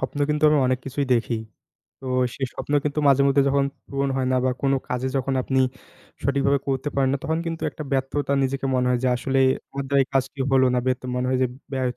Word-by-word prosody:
স্বপ্ন 145 - -4
কিন্তু 150 +1 +1
আমি 150 -1 +4
অনেক 130 0 +1
কিছুই 140 +1 -2
দেখি, 115 0 0 0.6
তো 135 - -9 0.3
সেই 135 - -2
স্বপ্ন - - -5
কিন্তু 150 0 -1
মাঝে 140 0 +5
মধ্যে 140 0 +4
যখন 140 0 +2 0.2
পূরণ 140 0 -1
হয় 130 -1 0
না, - - +3
বা 130 - +3
কোনো 135 0 +3
কাজে 125 +1 -1
যখন 135 0 -1
আপনি 130 +1 +1 0.6
সঠিক 140 0 +1
ভাবে 140 0 +3
করতে 135 +1 -1
পারেন 135 -1 +2
না 140 - 0
তখন 160 0 0
কিন্তু 165 -1 -4
একটা 155 - -8
ব্যর্থতা 135 +1 0
নিজেকে 135 +1 -1
মনে 125 0 +2
হয় 125 - +2
যে, - - +3
আসলে 135 +2 0 0.3
আমার 140 0 -3
দ্বারা 140 0 +3
এই - - -27
কাজটি 135 +1 0
হলো 130 -1 +5
না 125 - +2
বে 130 - +4
তো - - -6
মনে 125 0 0
হয় 130 - +1
যে - - +4 0.3
ব্যর্থ 130 -2 -1
135 Hz, 235 wpm, -23 LUFS, 130-140 Hz, 0.6 s, মাঝে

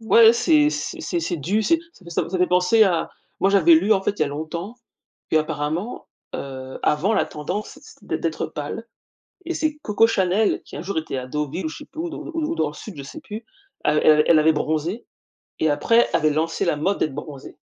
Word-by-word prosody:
Ouais, 225 0 +7
c'est 300 +4 +4
c'est - - -4
c'est 345 - -2
c'est 180 - -2
du 190 +9 0
c'est 330 +8 +3 0.2
ça 190 - -20
ça 170 - 0
ça - - -9
ça 185 - -1
me - - +3
fait - - +4
penser 180 +5 +4
à 175 -4 0 0.3
moi, 195 - +4
j'avais 175 -4 +6
lu, 185 +7 +2
en 195 - 0
fait, - - +1
il - - -10
y - - +5
a 140 - -3
longtemps, 165 +9 -5 0.5
qu'apparemment, 155 +6 -1 0.3
heu, 130 -1 -6
avant 175 +9 +2
la - - +2
tendance 180 +8 -5
c'était 160 - -6
d - - -8
d'être 165 -2 -2
pâle, 150 +10 -6 0.6
et 345 - -2
c'est 310 -1 -1
Coco 210 -1 +4
Chanel 195 0 +1
qui - - -11
un 150 - -5
jour 195 0 -4
était 155 -4 -5
à 130 - -4
Deauville 150 +5 -3
ou - - -1
je - - -8
sais 295 - -10
plus 315 +2 -7
où 340 - -3
d 330 - -7
où 335 - -7 0.2
où - - -1
dans 155 - +1
le - - -11
sud, 195 +5 -9
je 140 - -6
sais 225 - -9
plus, 225 -4 -8 0.4
elle 150 0 +3
elle 150 0 +6
elle 160 - +6
avait 160 +1 +4
bronzé 160 +8 -2 0.5
et 155 - +2
après, 230 +11 +3
avait 155 -1 +3
lancé 160 +2 -1
la 170 - +2
mode 190 +7 0
d'être 155 - 0
bronzée. 145 -2 -9
175 Hz, 240 wpm, -22 LUFS, 150-220 Hz, 0.6 s, Ouais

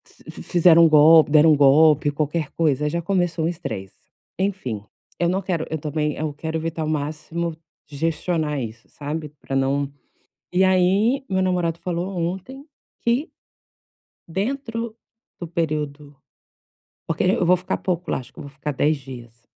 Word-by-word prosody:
Fiz - - -12
fizeram 170 -1 +6
um - - +5
golpe 155 0 +7
deram 155 +1 +6
um - - +6
golpe, 145 +1 +5
qualquer 150 +1 -2
coisa 150 -2 +1
já 170 +3 -2
começou 175 -2 0
um - - +2
estresse. 160 - -6 0.4
Enfim, 185 - -2 0.4
eu 170 - +2
não 190 +2 0
quero 175 -4 -2
eu 160 - -2
também 150 0 -2
eu 155 0 -3
quero 160 +2 -4
evitar 165 0 -4
ao - - -3
máximo, 155 +2 -3 0.3
gestionar 155 0 -1
isso, 115 0 -8
sabe. 150 +1 -5
Para 140 -2 -7
não 135 +1 0 0.6
e 185 +1 +4
aí 195 +8 +3
meu 190 0 +1
namorado 175 -3 0
falou 175 0 -3
ontem, 190 +11 -4 0.4
que 245 +8 0 1.0
dentro 230 - -3 0.4
do 175 - -4
período 150 -3 -3 0.9
porque - - -1
eu 185 0 +2
vou 180 +2 +5
ficar 180 +1 -3
pouco 180 -1 -2
lá, - - 0
acho 125 - -11
que - - -19
eu - - -6
vou 140 - -10
ficar 150 +1 -5
10 150 +3 +1
dias. 120 -4 -11
160 Hz, 160 wpm, -22 LUFS, 150-180 Hz, 1.0 s, golpe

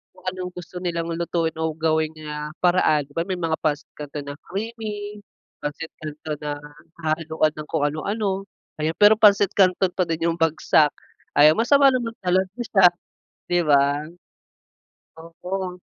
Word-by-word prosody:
kung 185 - -19
anong 180 -1 -6
gusto 180 0 -8
nilang 170 -2 -2
lutuin 165 -1 -1
o 160 0 0
gawin 160 -1 +1
na 150 -1 -6
paraan. 175 -4 +3
'Di 145 - -21
ba 165 - 0
may 185 -2 -3
mga 165 -2 0
Pansit 150 -2 -1
Canton 145 -1 -7
na 145 - -5
creamy, 210 0 -5 0.4
Pancit 150 +2 -5
Canton 150 0 -6
na 150 -1 -4 0.5
hahaluan 155 0 0
ng 150 0 -7
kung 160 -3 -1
ano-ano. 195 +5 -2 0.4
Ayan 155 +2 -1
pero 210 +1 +6
pansit 205 -2 +5
kanton 185 -1 +3
pa 180 -1 -1
din 165 0 -2
yung 165 - -6
bagsak, 160 -1 +3 0.5
ayan 150 +1 +8
masama 275 +3 +5
naman 235 -3 -2
talaga 185 +1 +2 0.2
siya 190 -5 +6 0.6
'di 175 0 +1
ba. 145 0 +2 1.1
Oo. 180 +2 -6
165 Hz, 150 wpm, -23 LUFS, 155-190 Hz, 1.1 s, ayan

